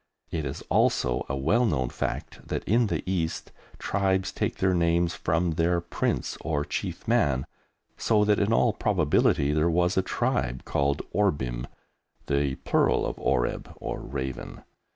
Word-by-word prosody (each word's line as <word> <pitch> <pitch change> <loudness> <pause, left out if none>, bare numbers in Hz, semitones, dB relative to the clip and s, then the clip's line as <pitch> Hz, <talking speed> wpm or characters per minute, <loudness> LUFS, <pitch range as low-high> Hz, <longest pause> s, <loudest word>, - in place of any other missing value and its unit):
It 80 -4 -2
is 65 0 -5
also 60 -1 +2
a 65 - -1
well 85 - +2
known 65 - +1
fact - - -4
that - - -2
in 115 +3 +3
the - - -2
East 85 -4 -2 0.3
tribes 95 -1 0
take - - -2
their 95 0 +2
names 85 0 +2
from 85 +1 0
their 85 +2 +1
prince 85 0 -2
or 75 -2 -1
chief - - -4
man, 65 -2 +2 0.5
so 105 -2 +3
that 105 0 +3
in 100 +2 +1
all 115 0 +3
probability 80 -7 +2
there 80 +2 +2
was 90 +3 +2
a - - +5
tribe 90 - -1
called 70 0 0
Orbim 65 -12 0 0.6
(the 70 -1 0
plural - - +3
of - - -4
"oreb" 60 -3 0
or - - -5
raven). 65 -2 -5
85 Hz, 150 wpm, -27 LUFS, 70-95 Hz, 0.6 s, a